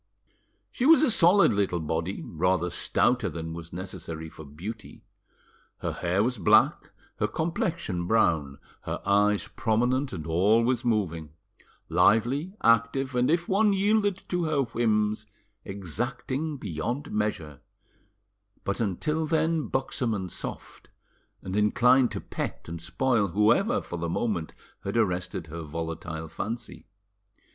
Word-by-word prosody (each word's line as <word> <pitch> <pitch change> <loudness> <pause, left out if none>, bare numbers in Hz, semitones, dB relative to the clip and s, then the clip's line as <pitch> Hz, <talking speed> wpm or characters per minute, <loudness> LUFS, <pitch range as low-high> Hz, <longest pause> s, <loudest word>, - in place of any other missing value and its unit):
She 255 - 0
was 320 -1 +7
a 270 - +4
solid 190 - +5
little 100 -3 0
body, 80 +4 -3
rather 90 +1 0
stouter 120 +6 +1
than 80 -1 -6
was 85 0 -8
necessary 85 -3 -6
for 80 - -11
beauty; 95 +9 -9 0.7
her - - -3
hair 90 +4 0
was 125 -1 -1
black, 85 - +4 0.3
her 105 - +1
complexion 160 - -2
brown, 80 -10 +2 0.2
her - - -4
eyes 105 +1 +3
prominent 125 +5 0
and 80 -5 -6
always 110 +9 +2
moving; 85 - -1 0.5
lively, 135 - +2
active, 115 +4 +3
and 125 0 +2
if 170 +2 +1
one 210 +3 +3
once 200 -1 +2
yielded 205 -1 +2
to 180 -2 0
her 155 -3 +1
whims, 110 -3 0 0.4
exacting 120 - -3
beyond 120 - -4
measure; 80 -10 -2 1.0
but 100 - -2
until 150 - -1
then 160 0 +1
buxom 130 -3 -1
and 95 -3 -4
soft, - - -8 0.5
and 95 +1 -4
inclined 125 +4 +4
to - - -4
pet - - -5
and 85 0 -6
spoil 115 +3 +1
whoever, 120 - +2
for 85 - -6
the 85 0 -2
moment, 85 -3 -2 0.3
had 100 +4 -2
arrested 90 -5 -1
her 85 +1 -7
volatile 80 0 -5
fancy. 115 +7 -6
105 Hz, 130 wpm, -27 LUFS, 85-130 Hz, 1.0 s, was